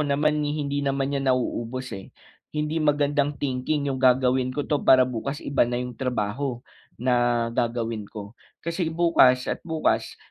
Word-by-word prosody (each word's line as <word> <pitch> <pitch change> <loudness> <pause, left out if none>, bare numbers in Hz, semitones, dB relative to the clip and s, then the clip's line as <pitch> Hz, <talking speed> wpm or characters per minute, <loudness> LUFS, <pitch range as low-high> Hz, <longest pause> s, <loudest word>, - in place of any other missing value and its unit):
naman 150 +1 +1
hindi 145 -1 -1
naman 135 0 -1
iyan 135 -1 -1
nauubos, 125 0 -1
eh. 95 -1 -7 0.5
Hindi 150 +2 -1
magandang 145 -1 +1
thinking 140 +2 -1
'yung, 130 - -4
"Gagawin 130 0 +3
ko 145 - -2
'to, 150 - 0
para 130 -1 +6
bukas 130 +4 -4
iba 140 -4 +2
na 120 - -1
'yung 125 0 -3
trabaho, 125 +1 -3 0.3
na 120 -1 +1
gagawin 115 -3 -2
ko." 105 -2 -9 0.3
Kasi 170 0 -1
bukas 160 -7 +4
at - - -3
bukas 160 -2 -1
130 Hz, 150 wpm, -25 LUFS, 120-145 Hz, 0.5 s, para